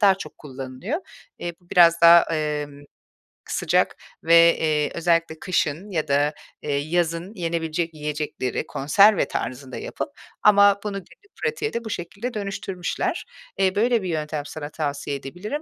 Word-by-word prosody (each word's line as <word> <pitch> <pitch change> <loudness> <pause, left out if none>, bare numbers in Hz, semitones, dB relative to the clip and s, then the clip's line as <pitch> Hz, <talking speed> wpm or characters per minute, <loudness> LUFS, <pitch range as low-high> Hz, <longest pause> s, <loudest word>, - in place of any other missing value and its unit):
daha 200 -3 +6
çok 190 - -10
kullanılıyor. 135 - -5 0.4
Eee, 175 - -4
bu 175 - -28
biraz 170 -1 +6
daha, 170 0 +9
emm, 150 -2 -3 0.7
sıcak - - +1 0.3
ve, 170 +1 +7
eee, 150 -2 +1
özellikle 165 -1 +1
kışın 175 +1 -1
ya 160 -4 -1
da, 145 +2 +2 0.3
eee, 145 -1 -1
yazın 170 +5 -1
yenebilecek 165 -2 -2
yiyecekleri 150 -4 -3
konserve 195 +9 +4
tarzında 130 0 -5
yapıp - - -5 0.3
ama 200 -1 +6
bunu 210 -1 -3
günlük 195 - -14
pratiğe 455 -1 -1
de 235 - -3
bu - - -5
şekilde 200 +7 -5
dönüştürmüşler. 195 -3 -3 0.3
Eee, 190 0 +2
böyle 230 +2 +2
bir 185 - -3
yöntem 150 -2 -3
sana 145 0 -7
tavsiye 145 -2 -3
edebilirim. 180 - -5
170 Hz, 140 wpm, -23 LUFS, 150-195 Hz, 0.7 s, daha